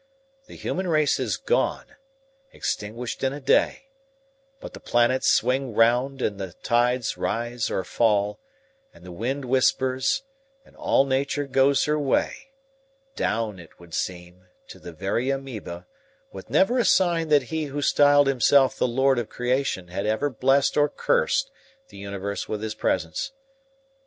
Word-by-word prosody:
The - - -12
human 190 0 -3
race 155 -3 +2
is - - -1
gone, - - -1 0.6
extinguished 115 +5 -4
in 135 0 +1
a 145 - -6
day, 145 - +1 0.7
but - - -10
the - - -9
planets 120 +2 +1
swing 130 -2 +1
round 125 +4 +2
and 100 -1 -2
the 95 -3 -6
tides 120 0 +1
rise 120 0 -2
or 95 - -2
fall, 105 0 +1 0.6
and - - -16
the 90 - -9
wind 130 +9 -3
whispers, 130 - +1 0.4
and - - -22
all 135 - +2
nature 140 +2 -1
goes 135 +1 +3
her 150 0 0
way, 150 - -1 0.6
down, 110 -4 -2
as 85 - -11
it - - -25
would 85 -2 -15
seem, 90 +1 -5 0.2
to - - -11
the 85 - -9
very 100 +9 -2
amoeba, 120 -10 -5 0.5
with 95 +2 -10
never 195 - +3
a - - +3
sign 170 -3 +3
that 145 -2 +4
he 160 -1 -1
who 145 0 -4
styled 145 0 +5
himself 135 0 +3
the - - 0
lord 130 +1 +2
of 115 - -5
creation 125 -7 -2
had 100 +4 -3
ever 110 +7 0
blessed 135 +2 +2
or 145 0 +4
cursed 485 - 0 0.4
the - - -14
universe 100 0 -5
with 105 0 -3
his 110 -1 -3
presence. 90 - -2
130 Hz, 155 wpm, -24 LUFS, 105-140 Hz, 0.7 s, styled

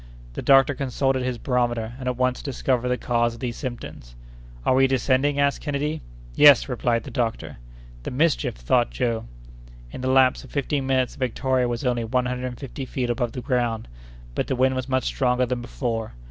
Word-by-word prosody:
The - - -5
doctor 135 +1 +5
consulted 135 0 0
his 125 -1 -2
barometer, 120 -3 -1
and 130 - -5
at 125 -1 -1
once 125 0 0
discovered 130 -3 -1
the 125 0 +1
cause 120 0 0
of - - -13
these 120 -2 -3
symptoms. 120 - -7 0.5
"Are - - +4
we 135 +1 +5
descending?" 135 +2 +1
asked 140 0 +1
Kennedy. 150 +2 -2 0.3
"Yes!" 145 - +7
replied 120 -2 0
the - - -9
doctor. 115 -4 -2 0.4
"The - - -5
mischief!" 150 +5 +1
thought - - +1
Joe 115 - -2 0.7
In - - -7
the 130 - -1
lapse 130 -1 +4
of - - -13
fifteen 140 -1 -1
minutes 130 -2 +1
the - - -15
Victoria 130 0 0
was 120 +2 -3
only 120 -2 +1
one 125 +2 0
hundred 125 0 -2
and 125 -1 -7
fifty 135 0 -6
feet 125 -1 -2
above 120 -1 -2
the 125 - -5
ground; 120 -4 -1 0.5
but - - -2
the - - 0
wind 130 +1 +3
was 130 0 -3
much 130 0 +1
stronger 125 -1 +1
than 125 0 -3
before. 115 -2 -3
125 Hz, 195 wpm, -24 LUFS, 120-135 Hz, 0.7 s, Yes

